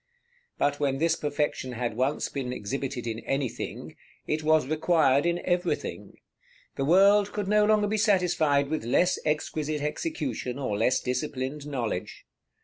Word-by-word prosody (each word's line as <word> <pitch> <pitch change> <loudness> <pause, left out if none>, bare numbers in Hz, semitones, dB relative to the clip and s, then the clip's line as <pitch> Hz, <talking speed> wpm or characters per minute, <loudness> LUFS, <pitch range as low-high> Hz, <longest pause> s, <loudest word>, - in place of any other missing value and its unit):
But 145 0 +1
when 140 -2 0
this 165 +3 +2
perfection 145 -3 -2
had 120 -2 -3
once 130 +5 0
been 130 -3 -4
exhibited 125 +3 -4
in 115 -1 -3
anything, 135 -1 -4 0.3
it 155 +1 -1
was 155 -2 +3
required 155 -1 +2
in 175 0 0
everything; 170 - -2 0.6
the 135 - -1
world 200 +5 +5
could 205 -2 -3
no 210 +1 +4
longer 215 -1 +3
be 210 +1 0
satisfied 170 -9 +2
with 155 -4 -2
less 175 +10 +2
exquisite 150 0 -1
execution, 150 - -3
or 130 -7 -2
less 115 +5 +2
disciplined 135 +2 -3
knowledge. 120 -10 -4
150 Hz, 140 wpm, -27 LUFS, 130-175 Hz, 0.6 s, world